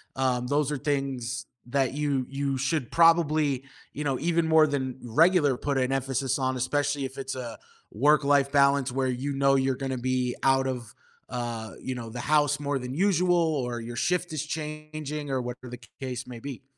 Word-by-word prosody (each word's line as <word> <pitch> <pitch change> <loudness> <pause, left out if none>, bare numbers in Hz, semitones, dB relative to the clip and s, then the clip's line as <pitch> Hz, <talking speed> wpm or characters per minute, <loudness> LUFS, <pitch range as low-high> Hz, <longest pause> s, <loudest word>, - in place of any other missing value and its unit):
Um, 125 -2 0
those 145 +1 +1
are 145 - -1
things 135 -3 -2 0.2
that 135 0 +1
you 140 -3 0
you 140 -1 -1
should 135 -1 -1
probably, 155 -5 +4 0.3
you 150 - -4
know, 135 -2 +1
even 170 +1 +1
more 160 -1 +6
than 130 -3 -2
regular 145 +2 +4
put 140 0 -1
an 130 0 +1
emphasis 135 0 0
on, 130 0 0
especially 145 +2 0
if 130 +1 -8
it's 135 0 -4
a 120 -3 -6 0.3
work-life 140 +2 +3
balance 140 -2 +3
where 130 0 0
you 130 +3 -2
know 135 0 +3
you're 135 -1 +2
gonna 130 -1 -3
be 125 0 0
out 135 0 +3
of, 120 -4 -5 0.4
uh, 120 -3 -4
you 130 - -3
know, 115 -2 -6
the 120 +2 -7
house 150 0 +2
more 140 -1 -1
than 125 +1 -5
usual 180 0 +3
or 140 -8 0
your 120 +1 -7
shift 180 +1 0
is 155 -1 -2
changing 150 -1 -5
or 130 -1 0
whatever 125 +1 -7
the 125 0 -8 0.2
case 130 -1 -4
may 120 -2 -8
be. 135 0 -7
135 Hz, 185 wpm, -27 LUFS, 130-150 Hz, 0.4 s, more